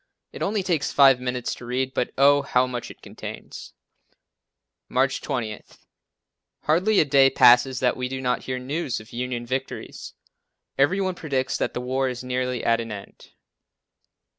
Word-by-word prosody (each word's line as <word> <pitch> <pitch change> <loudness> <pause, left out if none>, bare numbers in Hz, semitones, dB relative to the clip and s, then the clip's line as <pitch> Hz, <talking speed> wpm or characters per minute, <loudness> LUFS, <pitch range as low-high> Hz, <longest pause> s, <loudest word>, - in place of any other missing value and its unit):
It - - -9
only 205 0 0
takes 170 -5 0
five 135 -3 +6
minutes 125 -1 -2
to 125 - -10
read 130 +2 -1
it - - -34
but, 125 - -1
oh, 140 +1 +5
how 130 -2 +2
much 125 -2 -5
it - - -14
contains. - - -9 1.2
March 135 +2 +1
20. 115 -7 -3 1.0
Hardly 185 +7 +3
a - - +4
day 135 -1 +5
passes 125 0 +5
that 125 -1 +2
we 125 0 -3
do 130 0 -4
not 125 -1 -1
hear 130 -1 -3
news 135 +2 -3
of 110 +1 -15
Union 120 0 -3
victories. 130 +2 -5 0.6
Every 145 +8 +2
one 190 -1 0
predicts 140 -6 -2
that - - -2
the 125 - -2
war 130 +1 -1
is 125 0 -6
nearly 125 -1 -2
at 115 0 +2
an 115 -1 -7
end. 100 -1 -10
130 Hz, 165 wpm, -24 LUFS, 125-140 Hz, 1.2 s, five